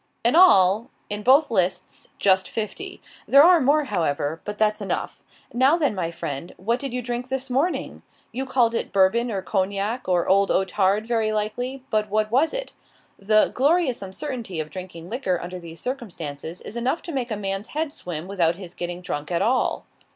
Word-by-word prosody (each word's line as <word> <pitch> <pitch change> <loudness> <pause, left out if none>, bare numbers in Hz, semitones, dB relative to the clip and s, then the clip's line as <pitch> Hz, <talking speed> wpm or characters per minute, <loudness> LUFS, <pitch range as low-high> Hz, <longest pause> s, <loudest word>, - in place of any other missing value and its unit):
In 240 - +4
all, 220 - +6 0.2
in 210 0 -3
both 270 +5 +4
lists, 185 -3 -1
just 190 -1 +3
fifty. 300 - -5 0.2
There 280 +1 +8
are 345 -1 +6
more, 290 +3 +3
however. 160 - -1
But 210 0 -5
that's 215 0 +1
enough. 190 -3 -3 0.3
Now 265 +6 +4
then, 295 -8 +1
my 180 -4 -2
friend, 160 -1 -6
what 230 +7 -1
did 275 -2 -4
you 250 0 -3
drink 245 +1 -4
this 265 0 -3
morning? 290 +8 -1 0.3
You 265 +3 -4
called 240 -3 +2
it - - -2
Bourbon, 200 +5 +3
or 195 -4 -3
Cognac, 200 +5 -1
or 175 -2 +2
Old 195 +1 +4
Otard, 195 +2 +1
very 225 -2 0
likely, 245 +5 -3
but 215 -1 +1
what 215 +1 0
was 280 +7 +3
it? - - -4 0.5
The 215 +2 +3
"glorious 285 - +2
uncertainty" 205 - -5
of 155 0 -4
drinking 180 -3 -8
liquor 195 -5 -1
under 180 +1 -6
these 165 -1 -11
circumstances 170 - -6
is 215 - -9
enough 250 +7 -1
to 340 - -6
make 260 -4 -2
a 215 - -2
man's 195 +1 -3
head 305 -1 -3
swim 170 -1 -6
without 175 -4 +1
his 180 -2 -10
getting 175 0 -5
drunk 150 -4 -4
at 170 +2 +1
all. 250 +4 +1
215 Hz, 185 wpm, -24 LUFS, 185-255 Hz, 0.5 s, There